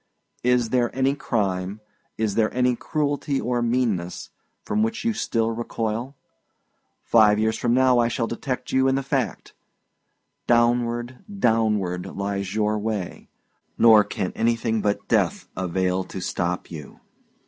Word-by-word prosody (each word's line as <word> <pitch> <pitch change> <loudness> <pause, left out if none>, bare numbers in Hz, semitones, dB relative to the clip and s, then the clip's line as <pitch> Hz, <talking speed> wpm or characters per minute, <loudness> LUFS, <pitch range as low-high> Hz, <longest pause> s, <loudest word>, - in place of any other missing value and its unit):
Is 125 -2 +2
there 120 -1 +2
any 135 +1 +2
crime, 100 -7 -2 0.4
is 110 -2 0
there 110 0 +1
any 125 -1 +2
cruelty 145 -1 -1
or 120 0 -1
meanness, 115 -7 -1 0.3
from 215 - 0
which 225 0 -1
you 230 - +2
still 115 - 0
recoil? 115 +2 -3 0.9
Five 105 -2 +5
years 110 +1 +1
from 120 0 +1
now 130 -1 +4
I 120 - +3
shall 115 0 -1
detect 125 +2 -4
you 130 0 +3
in 135 - +2
the 135 - -1
fact! 135 -2 -2 0.9
Downward, 120 +1 +1
downward, 105 - +1
lies 100 0 -4
your 105 0 +1
way; 105 -4 -4 0.5
nor 110 -2 +7
can 95 -2 -3
anything 115 -1 0
but 105 0 -1
death - - +1
avail 95 0 -1
to - - -7
stop 90 -1 -3
you." 75 -4 -9
115 Hz, 135 wpm, -24 LUFS, 105-125 Hz, 0.9 s, nor